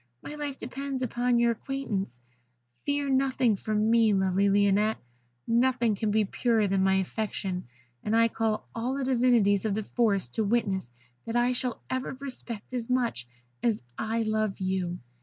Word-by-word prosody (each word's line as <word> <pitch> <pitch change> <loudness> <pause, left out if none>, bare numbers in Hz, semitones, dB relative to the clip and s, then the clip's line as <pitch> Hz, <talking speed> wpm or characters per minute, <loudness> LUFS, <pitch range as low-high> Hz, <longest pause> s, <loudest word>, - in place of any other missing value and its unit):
My - - -7
life 290 -2 -4
depends 270 +1 -4
upon 245 0 +1
your 235 0 +4
acquiescence. 215 - -3 0.7
Fear 285 -1 0
nothing 260 -4 +2
from 215 +2 0
me, 225 -3 +4
lovely 190 +1 +2
Lionette; 205 +2 +3 0.5
nothing 240 -1 +2
can 210 +2 -1
be 215 0 +2
purer 225 +1 +1
than 195 0 +1
my 190 0 +3
affection, 190 - -2 0.4
and 215 - 0
I 230 0 +5
call 225 -1 -1
all 240 +3 -2
the 275 - -2
divinities 240 -6 +3
of 215 -3 0
the 215 - -2
forest 200 - 0
to 220 - +1
witness 200 - 0 0.4
that 230 - -3
I 240 +1 +3
shall 250 -1 -3
ever 260 0 -3
respect 255 -4 -7
as 240 -2 -3
much 240 - 0 0.3
as 225 - 0
I 225 +1 -1
love 215 -2 -1
you.' 185 -2 -1
225 Hz, 160 wpm, -28 LUFS, 200-250 Hz, 0.7 s, I